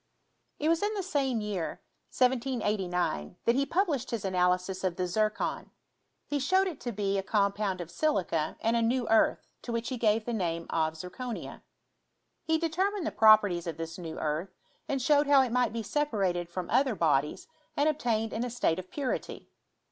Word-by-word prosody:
It 300 Hz, -, -1 dB
was 330 Hz, 0 st, +3 dB
in 420 Hz, +1 st, 0 dB
the 395 Hz, -, -2 dB
same 270 Hz, -, 0 dB
year, 200 Hz, -5 st, -3 dB, 0.3 s
1789, 210 Hz, -, 0 dB
that 235 Hz, -, +4 dB
he 275 Hz, +2 st, +1 dB
published 330 Hz, -, 0 dB
his 225 Hz, -4 st, -3 dB
analysis 180 Hz, 0 st, +1 dB
of 185 Hz, -2 st, 0 dB
the 180 Hz, -, -1 dB
zircon; 215 Hz, +4 st, -1 dB, 0.6 s
he 290 Hz, -, -1 dB
showed 375 Hz, +8 st, +3 dB
it 355 Hz, -7 st, -4 dB
to 240 Hz, -, -4 dB
be 200 Hz, -2 st, -1 dB
a -, -, 0 dB
com 200 Hz, 0 st, +1 dB
pound 200 Hz, -3 st, -2 dB
of 170 Hz, -1 st, -8 dB
silica 175 Hz, -, 0 dB
and 225 Hz, +1 st, +1 dB
a 235 Hz, -, +2 dB
new 240 Hz, +1 st, +1 dB
earth, 225 Hz, 0 st, +2 dB
to 240 Hz, -, -6 dB
which 230 Hz, 0 st, -2 dB
he 255 Hz, -, -3 dB
gave 215 Hz, -1 st, +2 dB
the 240 Hz, -, -2 dB
name 170 Hz, -5 st, -2 dB
of 160 Hz, -1 st, 0 dB
zirconia. 225 Hz, +8 st, -6 dB, 0.8 s
He 320 Hz, 0 st, +2 dB
determined 360 Hz, +4 st, -1 dB
the -, -, -1 dB
properties 210 Hz, -6 st, +5 dB
of 160 Hz, -2 st, -4 dB
this 165 Hz, +1 st, -6 dB
new 165 Hz, -2 st, -6 dB
earth, 155 Hz, +4 st, -2 dB, 0.4 s
and 275 Hz, -, 0 dB
showed 290 Hz, +2 st, +3 dB
how 280 Hz, -2 st, +6 dB
it 250 Hz, -, -3 dB
might 250 Hz, -1 st, +2 dB
be 230 Hz, 0 st, -4 dB
sepa 295 Hz, +3 st, -1 dB
rated 175 Hz, -4 st, 0 dB
from 175 Hz, 0 st, -4 dB
other 255 Hz, 0 st, +3 dB
bodies 150 Hz, -4 st, +1 dB, 0.3 s
and 290 Hz, -, +3 dB
obtained 230 Hz, -7 st, 0 dB
in 225 Hz, -, -1 dB
a 250 Hz, -, -2 dB
state 185 Hz, -8 st, 0 dB
of 185 Hz, 0 st, -9 dB
purity. 275 Hz, -4 st, -4 dB
220 Hz, 190 wpm, -29 LUFS, 180-265 Hz, 0.8 s, how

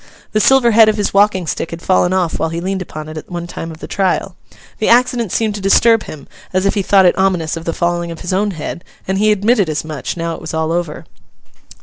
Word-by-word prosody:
The 215 Hz, -, +1 dB
silver 250 Hz, +1 st, +4 dB
head 220 Hz, 0 st, +6 dB
of 215 Hz, -, 0 dB
his 205 Hz, -, -1 dB
walking 200 Hz, -2 st, +3 dB
stick 160 Hz, -, -3 dB
had 165 Hz, -, -7 dB
fallen 185 Hz, -1 st, +2 dB
off 185 Hz, -3 st, 0 dB
while 160 Hz, -, 0 dB
he 165 Hz, +1 st, -4 dB
leaned 190 Hz, +2 st, -3 dB
upon 155 Hz, -3 st, -7 dB
it, 155 Hz, 0 st, -8 dB
at 155 Hz, -, -9 dB
one 175 Hz, -1 st, -5 dB
time 165 Hz, -1 st, -7 dB
of 160 Hz, -, -9 dB
the -, -, -7 dB
trial. 190 Hz, -1 st, -1 dB, 0.4 s
The 215 Hz, -, +1 dB
accident 240 Hz, -3 st, +3 dB
seemed 220 Hz, -2 st, 0 dB
to 205 Hz, -, -6 dB
disturb 225 Hz, +3 st, +4 dB
him, 145 Hz, -3 st, -10 dB, 0.2 s
as 185 Hz, +1 st, 0 dB
if 200 Hz, -, +2 dB
he 205 Hz, -, 0 dB
thought 195 Hz, 0 st, +4 dB
it 175 Hz, -, +4 dB
ominous 180 Hz, -5 st, +1 dB
of 165 Hz, 0 st, -7 dB
the 165 Hz, -, -1 dB
falling 175 Hz, 0 st, -1 dB
of 165 Hz, -1 st, -8 dB
his 180 Hz, -, -3 dB
own 205 Hz, +3 st, +1 dB
head; 170 Hz, -1 st, -6 dB, 0.2 s
and 190 Hz, +1 st, -1 dB
he 215 Hz, +1 st, +3 dB
admitted 210 Hz, -2 st, +2 dB
as 155 Hz, 0 st, -2 dB
much, 155 Hz, 0 st, -5 dB
now 165 Hz, 0 st, -2 dB
it -, -, -8 dB
was 160 Hz, -, -6 dB
all 160 Hz, 0 st, -1 dB
over. 170 Hz, -3 st, -3 dB
185 Hz, 255 wpm, -16 LUFS, 165-205 Hz, 0.4 s, head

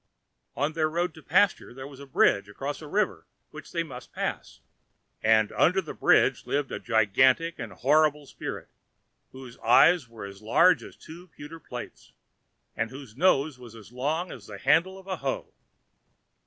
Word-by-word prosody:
On 145 Hz, +3 st, -1 dB
their 155 Hz, -1 st, 0 dB
road 170 Hz, +1 st, -1 dB
to 160 Hz, -, -14 dB
the -, -, -32 dB
pasture 185 Hz, -6 st, +2 dB
there 130 Hz, 0 st, -8 dB
was 140 Hz, -1 st, -11 dB
a 140 Hz, -, -11 dB
bridge 100 Hz, -6 st, +2 dB
across 140 Hz, +9 st, -5 dB
a 155 Hz, -, -9 dB
river 200 Hz, +5 st, -1 dB, 0.2 s
which 155 Hz, -1 st, -11 dB
they 170 Hz, -1 st, -1 dB
must 125 Hz, -6 st, -11 dB
pass, -, -, -5 dB, 0.6 s
and 110 Hz, -1 st, +3 dB
under 180 Hz, +3 st, +3 dB
the -, -, -6 dB
bridge -, -, +3 dB
lived 145 Hz, -1 st, -1 dB
a -, -, -4 dB
gigantic 130 Hz, +9 st, +2 dB
and 115 Hz, -, -6 dB
horrible 150 Hz, +7 st, +2 dB
spirit, -, -, -7 dB, 0.6 s
whose 130 Hz, -2 st, -12 dB
eyes 145 Hz, +4 st, +5 dB
were 115 Hz, -3 st, -9 dB
as 100 Hz, 0 st, -11 dB
large 145 Hz, +12 st, +4 dB
as -, -, -12 dB
two 170 Hz, +3 st, -13 dB
pewter 155 Hz, 0 st, -11 dB
plates, -, -, -10 dB, 0.6 s
and 110 Hz, 0 st, -2 dB
whose 130 Hz, -3 st, -11 dB
nose 145 Hz, -3 st, +2 dB
was 120 Hz, -2 st, -12 dB
as 110 Hz, -1 st, -14 dB
long 150 Hz, +8 st, -2 dB
as 105 Hz, -6 st, -11 dB
the 105 Hz, -, -8 dB
handle 165 Hz, -, +2 dB
of 190 Hz, -, -14 dB
a 190 Hz, -2 st, -4 dB
hoe. 135 Hz, -3 st, -4 dB
140 Hz, 175 wpm, -27 LUFS, 120-165 Hz, 0.6 s, eyes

